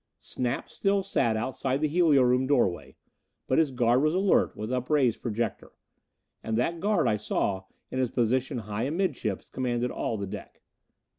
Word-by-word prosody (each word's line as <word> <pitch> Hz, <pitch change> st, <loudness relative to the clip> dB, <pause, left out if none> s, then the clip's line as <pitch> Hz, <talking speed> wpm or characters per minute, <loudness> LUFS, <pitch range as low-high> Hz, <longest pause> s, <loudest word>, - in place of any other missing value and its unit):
Snap 125 Hz, -1 st, -3 dB
still 200 Hz, -1 st, 0 dB
sat 120 Hz, -, +1 dB
outside 130 Hz, +3 st, -1 dB
the 155 Hz, -, +1 dB
helio 155 Hz, -4 st, +4 dB
room 125 Hz, +1 st, +2 dB
doorway. 120 Hz, -11 st, +1 dB, 0.5 s
But 130 Hz, -, +2 dB
his 160 Hz, -3 st, +3 dB
guard 125 Hz, -1 st, +2 dB
was 155 Hz, +3 st, +2 dB
alert, 195 Hz, +1 st, +2 dB
with 110 Hz, +3 st, -4 dB
upraised 125 Hz, -1 st, +1 dB
projector. 115 Hz, -1 st, -3 dB, 0.7 s
And 110 Hz, 0 st, -1 dB
that 165 Hz, +8 st, 0 dB
guard, 205 Hz, +4 st, +2 dB
I 105 Hz, -, +2 dB
saw, 95 Hz, -2 st, -1 dB, 0.3 s
in 130 Hz, -, -2 dB
his 130 Hz, -2 st, +1 dB
position 125 Hz, +3 st, 0 dB
high 105 Hz, +3 st, -2 dB
amidships, 145 Hz, -, -2 dB
commanded 125 Hz, -1 st, -2 dB
all 115 Hz, -, -2 dB
the 100 Hz, -, -3 dB
deck. 95 Hz, -, -9 dB
125 Hz, 160 wpm, -27 LUFS, 115-150 Hz, 0.7 s, helio